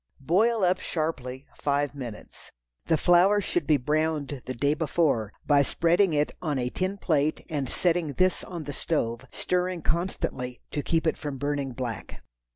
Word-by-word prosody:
Boil 215 - +3
up 185 +1 +3
sharply 135 -5 -3
five 145 0 0
minutes. 120 -7 -9 0.4
The 160 - +3
flour 180 +5 +5
should 175 -5 -1
be 155 -2 +5
browned 150 0 -1
the 130 - -3
day 140 +5 +2
before, 150 -8 +1
by 145 -1 +5
spreading 170 +6 +3
it 150 -1 +1
on 150 -5 -1
a 125 -1 -1
tin 190 +2 -2
plate 155 -5 0
and 140 -4 -1
setting 170 -4 +1
this 185 +3 +2
on 170 -3 -6
the 145 0 -5
stove, 120 -7 -1
stirring 180 -2 -1
constantly 130 -8 -2
to 145 - -1
keep 165 +2 0
it 160 - +1
from 145 -3 -4
burning 140 -1 -2
black. 120 -4 -6
150 Hz, 160 wpm, -27 LUFS, 135-175 Hz, 0.4 s, flour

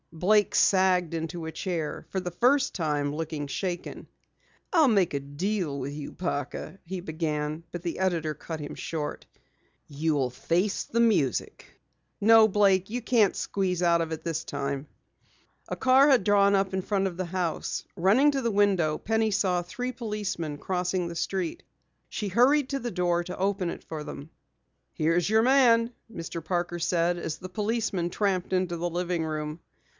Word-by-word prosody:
Blake 205 +5 +2
sagged 185 -3 +3
into 165 +1 -4
a 160 - -4
chair, 165 -3 -3
for 190 - -2
the 180 -1 -4
first 265 - +2
time 150 -4 -1
looking 155 -2 -4
shaken. 175 +4 -4 0.7
"I'll 320 -6 +5
make 195 -8 +2
a 140 - -1
deal 150 +1 -2
with 135 +2 -4
you, 145 -1 -6
Parker," 170 +2 -4
he 185 +2 -5
began, 155 -2 -3
but 175 -1 -6
the 170 0 -3
editor 170 -5 0
cut 160 +2 -7
him 145 - -6
short. 150 -3 -4 0.6
"You'll 145 -3 0
face 175 +10 0
the 235 - -2
music! 200 - +1 0.5
No, 220 +1 +7
Blake, 195 -2 +3
you 245 +3 -3
can't 225 -4 +3
squeeze 185 -3 -1
out 170 -1 +3
of 165 -1 -3
it 160 0 -5
this 165 -1 -2
time." 140 -1 -4 0.8
A - - -3
car 265 +2 +5
had 260 -7 +5
drawn 200 -1 +4
up 195 -1 0
in 190 - 0
front 195 0 0
of 180 - -5
the 185 +1 -3
house. 175 -2 -3
Running 220 +12 +4
to 275 -1 -1
the 235 -2 0
window, 190 -7 +2
Penny 220 0 0
saw 185 -3 +1
three 245 +8 -4
policemen 210 - -4
crossing 180 +1 -1
the 170 - -6
street. 180 0 -2 0.5
She 210 - -3
hurried 255 +8 +3
to 275 - -1
the 240 -1 -4
door 175 -2 +1
to 180 +1 -7
open 195 -1 0
it - - -7
for 155 -2 -6
them. 145 +1 -9 0.6
"Here's 165 +3 +1
your 220 +1 +4
man," 240 -3 +4 0.2
Mr. 165 -2 -6
Parker 175 +1 -2
said 175 0 +1
as 160 -2 -4
the 185 - -8
policemen 210 -3 -1
tramped 190 -1 -1
into 185 -2 0
the 175 +1 -2
living 175 -1 -1
room. 155 0 -4
180 Hz, 170 wpm, -27 LUFS, 160-205 Hz, 0.8 s, No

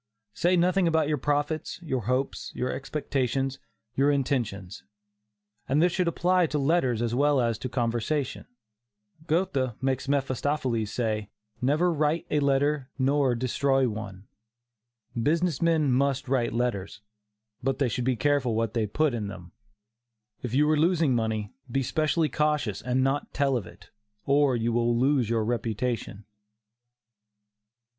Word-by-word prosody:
Say 180 +8 +2
nothing 180 +1 +3
about 160 -2 +2
your 150 -2 0
profits, 145 +4 -1
your 130 -9 -2
hopes, 130 +3 -1
your 125 +1 -1
expectations, 135 -1 -2 0.3
your 135 +3 +3
intentions. 120 -9 -1 0.9
And 140 +3 +3
this 175 +2 +4
should 180 0 0
apply 180 +1 +2
to 150 - -2
letters 135 -6 +1
as 115 -1 -1
well 145 +2 +3
as 115 -3 0
to 130 - -4
conversation. 120 +3 -1 0.8
Goethe 155 - 0
makes 130 0 -1
Mephistophiles 135 -4 0
say: 110 -3 -2 0.3
"never 155 +7 +2
write 155 +1 0
a 150 - +3
letter 140 0 +1
nor 135 -1 +2
destroy 130 +2 +1
one." 105 -3 -6 1.0
Business 165 +2 +1
men 160 -4 +3
must 135 +1 +1
write 125 -2 +1
letters, 115 -5 -2 0.6
but 135 +1 0
they 140 - +1
should 125 +1 -2
be 130 0 +1
careful 130 -1 +1
what 115 -1 -1
they 110 -3 0
put 150 +6 +1
in 110 -4 -3
them. 90 -3 -9 0.9
If 125 0 -3
you 150 +2 +4
are 155 - +2
losing 165 -4 +3
money, 110 -3 -2 0.2
be 135 +2 +1
specially 155 +3 +1
cautious 150 -9 0
and 125 +2 0
not 135 +2 -1
tell 140 -1 +2
of 110 -7 -3
it, - - -16 0.3
or 140 -2 +3
you 115 0 0
will 120 0 +2
lose 130 -2 +2
your 115 -2 +1
reputation. 115 -2 -2
135 Hz, 145 wpm, -27 LUFS, 120-150 Hz, 1.0 s, this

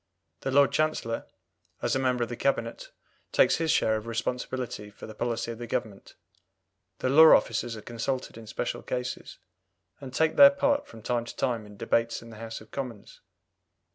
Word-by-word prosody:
The - - -3
Lord 140 -2 +5
Chancellor, 155 -7 -1 0.6
as 120 - +1
a - - +1
member 125 -2 +1
of 115 - -4
the 120 - -4
Cabinet, 320 - -1 0.4
takes - - +4
his 165 -1 -1
share 110 -6 +3
in 110 - -6
responsibility 120 -1 -3
for 105 - -11
the 110 - -9
policy 115 +1 -2
of 115 - -8
the 120 - -6
Government. 105 -3 -4 0.8
The 130 - -1
law 160 +4 +9
officers 120 -2 -3
are - - -8
consulted 125 +3 -3
in 115 -1 -11
special - - -3
cases, 125 0 -5 0.6
and 135 -2 -8
take 160 +4 +1
their 280 -1 +11
part 285 +1 +1
from 110 - -13
time 120 0 -1
to - - -9
time 120 -5 -1
in 105 -1 -14
debates 115 +2 0
in 115 - -12
the 110 - -11
House 115 -1 -7
of 110 - -16
Commons. 125 -7 -7
120 Hz, 185 wpm, -28 LUFS, 115-135 Hz, 0.8 s, their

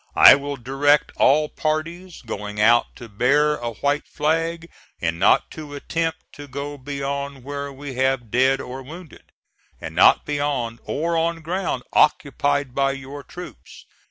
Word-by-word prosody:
I - - +10
will 140 +1 -2
direct 135 +4 +2
all 150 +3 +4
parties 165 +4 -4
going 105 -2 -6
out 115 +3 +4
to 120 - -10
bear 145 +8 +2
a 120 -1 -4
white 145 +6 -1
flag, 165 +2 -1 0.3
and 85 0 -2
not 100 - +3
to 150 -2 -8
attempt 165 +3 -2
to 145 0 -10
go 140 +2 -5
beyond 140 0 -4
where 140 +1 -5
we 140 0 -8
have 130 -4 0
dead 130 +2 +3
or 130 +1 -7
wounded, 160 +4 -12 0.5
and - - -7
not - - +5
beyond 140 -6 -2
or 165 +3 -1
on 165 0 0
ground 170 -6 -2
occupied 145 -2 +2
by 135 0 +1
your 140 +1 -8
troops. 180 0 -11
140 Hz, 150 wpm, -22 LUFS, 130-150 Hz, 0.5 s, I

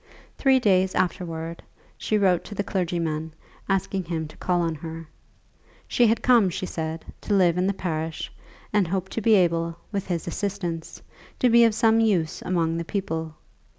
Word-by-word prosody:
Three 265 -2 +4
days 190 -5 +2
afterwards 165 -2 -2 0.3
she 215 - 0
wrote 185 -4 +3
to 210 - -8
the 200 - -1
clergyman, 165 -5 -2 0.3
asking 195 -1 0
him 160 -2 -3
to - - -15
call 180 -1 0
on 165 -1 0
her. 160 +1 -8 0.8
She 240 - +3
had 225 +1 +1
come, 235 -6 +5
she 180 - -4
said, 160 -2 -4 0.2
to 205 - 0
live 180 -3 +4
in 180 +1 +1
the 200 - +1
parish, 160 -3 -3 0.4
and 205 -4 +3
hoped 190 +2 -2
to 225 - -2
be 220 +1 +5
able, 170 -2 +1
with 200 -3 -3
his 175 -3 -2
assistance, 175 -3 -4 0.3
to 250 - +3
be 235 0 +7
of 225 -2 +2
some 225 0 +4
use 190 -8 +1
among 165 -2 0
the 170 - -2
people. 160 -5 -3
180 Hz, 175 wpm, -25 LUFS, 165-200 Hz, 0.8 s, be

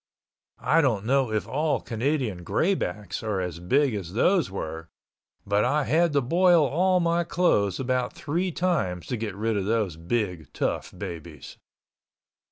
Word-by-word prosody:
I 155 +6 +3
don't 115 -8 +1
know 130 -1 +2
if 110 -1 -1
all 150 +3 0
Canadian 115 - -2
Greybacks 105 - -1
are 105 -3 -2
as 90 -2 -4
big 130 +9 +2
as 95 -4 -5
those 175 - +2
were, 80 -3 -6 0.6
but 100 +1 +2
I 145 +4 +2
had 165 +2 +2
to 140 - +3
boil 170 +4 +4
all 180 +7 +2
my 170 0 +1
clothes 130 - +1
about 125 -1 -1
three 175 +5 -2
times 150 - -1
to 125 - -3
get 110 -4 -4
rid 110 +2 -1
of 100 -2 -1
those 105 -6 0
big 90 - -2
tough - - -2
babies. 80 -4 -8
120 Hz, 155 wpm, -26 LUFS, 95-155 Hz, 0.6 s, boil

